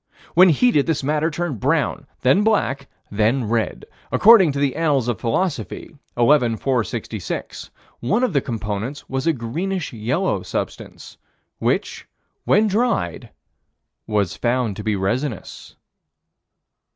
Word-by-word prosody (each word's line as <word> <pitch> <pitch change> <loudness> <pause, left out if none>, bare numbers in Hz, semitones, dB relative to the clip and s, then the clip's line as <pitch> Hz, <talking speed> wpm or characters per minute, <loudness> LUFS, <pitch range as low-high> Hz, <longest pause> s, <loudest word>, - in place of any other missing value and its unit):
When 185 +3 +7
heated, 160 - +3
this 160 -4 0
matter 150 +3 +1
turned 160 -6 -3
brown, 145 +1 0
then 135 +11 +4
black, 140 -11 0 0.2
then 110 +4 +1
red. 115 0 -1 0.3
According 205 -7 +6
to - - -4
the 140 -2 0
Annals 145 -6 +1
of 120 - -2
Philosophy, 125 - -2 0.2
11 120 -2 +3
466, 115 - -3 0.3
one 210 - 0
of 250 - +1
the 140 - +2
components 115 +3 -4
was 135 +3 -3
a - - +5
greenish 160 +9 -3
yellow 125 - -1
substance, - - -6 0.4
which, - - -1 0.4
when 215 - +4
dried, 210 - -1 0.8
was 100 -6 0
found 120 -3 0
to 105 - -6
be 110 -1 0
resinous. 115 +5 -3
135 Hz, 125 wpm, -21 LUFS, 115-165 Hz, 0.8 s, When